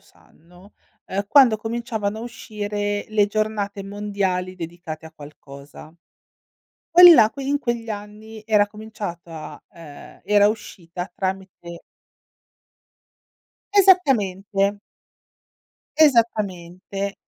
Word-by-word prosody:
sanno 180 +5 -22 0.3
ehm, 200 +2 -3
quando 255 -5 +6
cominciavano 220 -2 -4
a - - -7
uscire 205 -3 -4
le 210 -1 +2
giornate 210 -1 -3
mondiali 195 -2 -3
dedicate 165 -2 -8
a 160 - -14
qualcosa. 145 +1 -13 1.0
Quelli 350 0 +10
la 220 -4 +5
que 275 - -8
in 285 +1 0
quegli 235 -4 -3
anni 210 +1 -9
era 210 -2 +3
cominciata 200 -7 -9
ehm, 155 -4 -14
era 205 +1 +4
uscita 180 -4 -6
tramite 190 -3 -6 1.9
Esattamente. 205 - +2 1.2
Esattamente. 200 - 0
205 Hz, 90 wpm, -22 LUFS, 180-220 Hz, 1.9 s, Quelli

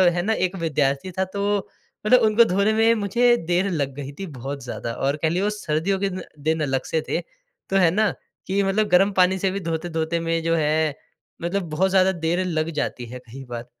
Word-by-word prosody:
है 175 - +1
ना 220 +5 +1
एक 185 -3 -1
विद्यार्थी 145 +2 0
था 190 +2 -1
तो 205 0 +1 0.5
मतलब 250 +4 +6
उनको 220 +1 +5
धोने 200 +2 +2
में 225 +1 +4
मुझे 235 +4 +3
देर 180 +3 +2
लग 140 -5 -1
गई 140 -1 -6
थी 195 - -3
बहुत 135 +2 -5
ज़्यादा 120 -1 -5
और 135 +4 0
कह 160 - +2
लिए 175 +3 0
वो 210 - +2
सर्दियों 190 -1 -1
के 200 - 0
ना 185 -1 -5 0.3
दिन 160 0 +2
अलग 135 -2 0
से 160 - +1
थे - - 0
तो - - -10
है 180 -3 +5
ना, 215 +3 +2 0.4
कि 195 +2 +1
मतलब 210 +2 +1
गर्म 195 +2 +4
पानी 185 +1 +4
से 190 0 +1
भी 200 - -3
धोते-धोते 165 -1 -2
में 165 0 -1
जो 165 0 +2
है, 155 -1 +1 0.5
मतलब 180 +3 -1
बहुत 175 +5 +1
ज़्यादा 190 0 +4
देर 175 +1 -1
लग 160 -2 -1
जाती 125 - -4
है 125 +2 -8
कई 135 +4 -9
बार। 120 0 -5
180 Hz, 215 wpm, -23 LUFS, 155-200 Hz, 0.5 s, मतलब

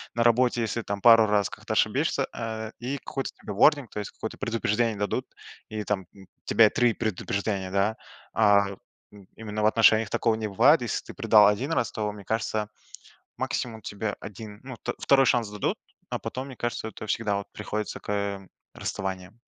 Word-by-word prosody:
на 115 - +2
работе, 120 +1 +3
если 115 +1 -1
там 100 -1 -4
пару 115 -1 +8
раз 105 -1 +2
как-то - - -6
ошибешься, - - +1
э, 110 -1 -4
и 130 +4 -3
какой-то 135 0 -4
тебе 105 - -6
warning, 140 +5 +4
то - - -5
есть 105 - -5
какое-то 110 - -7
предупреждение 115 0 0
дадут, 105 0 -1 0.4
и 110 -1 -4
там 100 -3 -2 0.4
тебе 110 -2 +6
3 120 0 +2
предупреждения, 100 -3 -2
да? 100 +3 +1 0.4
А. 105 -2 +4 0.4
Им 100 -2 -15
именно 105 -1 -4
в - - +4
отношениях 110 -1 +5
такого 115 +2 +1
не 110 -1 -3
бывает. 125 +10 +5
Если 120 - -2
ты - - -9
предал 105 -2 +6
1 120 +9 0
раз, 120 -8 0
то, 105 -1 -2
мне 100 -1 -11
кажется, 110 -1 -1 0.7
максимум 115 -3 -3
тебе 105 +1 -4
1, 105 +1 -9
ну, 130 -1 -7
вт - - -4
второй 135 -1 +4
шанс 120 -3 +2
дадут, 105 -1 -2 0.3
а - - -2
потом, 130 +1 -5
мне 130 - -9
кажется, 120 -2 -3
это 110 - -8
всегда 105 0 0
вот 100 - -7
приходится 105 0 -4
к 100 -1 -3 0.3
расставаниям. 95 +2 -5
110 Hz, 180 wpm, -26 LUFS, 105-115 Hz, 0.7 s, пару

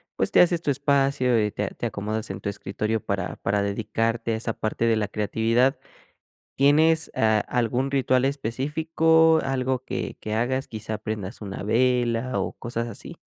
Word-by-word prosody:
pues, - - 0
te - - +6
haces 175 -1 +3
tu 145 - 0
espacio 135 -4 +2
y 105 - -1
te 105 -1 -3
te - - -4
acomodas 110 0 -3
en 95 - -6
tu 100 - -2
escritorio 105 +2 -2
para - - -3
para 100 +1 0
dedicarte 115 +3 -1
a - - 0
esa 115 0 -3
parte 110 +2 -2
de 115 -1 +3
la 105 -1 -1
creatividad, 115 +5 +1 0.8
¿tienes, 160 +3 +4
ah, 110 -1 +3
algún 125 +2 0
ritual 130 -1 +2
específico, 160 +5 +2
algo 130 -1 -1
que - - -4
que 110 - -5
hagas? 130 +4 0
¿Quizá 110 -1 -5
prendas 105 0 -6
una 100 -1 -6
vela 120 +2 +1
o - - -2
cosas 115 0 -4
así? 115 - -9
120 Hz, 165 wpm, -25 LUFS, 110-135 Hz, 0.8 s, te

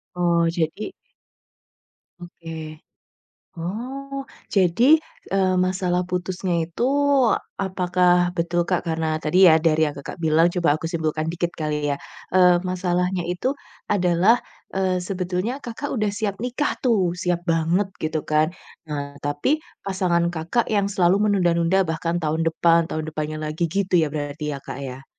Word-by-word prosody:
Oh, 170 -1 +2
jadi 165 - -2 1.3
Oke. 170 -1 -10 1.1
Oh, 265 +10 -5 0.3
jadi, 185 +2 +3 0.5
eee, 190 -1 +3
masalah 180 -1 0
putusnya 180 0 -2
itu 170 +8 -4 0.8
apakah 180 -1 +2 0.3
betul, 170 +1 +1
Kak, 180 -1 0
karena 160 -1 0
tadi 160 +4 +1
ya, 160 - +7
dari 160 -1 +3
yang 145 - -9
Kakak 140 +5 -7
bilang, 160 +1 +4
coba 175 -3 +1
aku 165 - -6
simpulkan 155 -1 -1
dikit 175 0 -1
kali 150 -1 -1
ya, 140 - +1 0.4
eee, 180 -1 +6
masalahnya 180 0 0
itu 180 +8 -2 0.4
adalah, 185 +2 +4 0.4
eee, 185 -1 +1
sebetulnya 185 +4 -2
Kakak 240 +5 -5
udah 215 -2 +1
siap 205 -2 -2
nikah 250 +4 -1
tuh, 230 -6 +3 0.2
siap 180 -1 0
banget 165 +4 +2 0.2
gitu 155 0 0
kan, 155 +1 +3 0.4
nah, 140 -1 -5
tapi 145 - -1 0.4
pasangan 175 -3 +1
Kakak 170 +9 0
yang 205 -2 +2
selalu 180 -1 +4
menunda-nunda 175 -3 +2
bahkan 165 +1 -1
tahun 160 +1 0
depan, 165 0 +3
tahun 155 0 -3
depannya 155 0 -4
lagi 155 +3 -3
gitu 195 -2 -1
ya 160 -2 +3
berarti 150 0 -3
ya, - - -5
Kak, 135 - -7
ya? 130 +1 -8
175 Hz, 140 wpm, -23 LUFS, 160-190 Hz, 1.3 s, ya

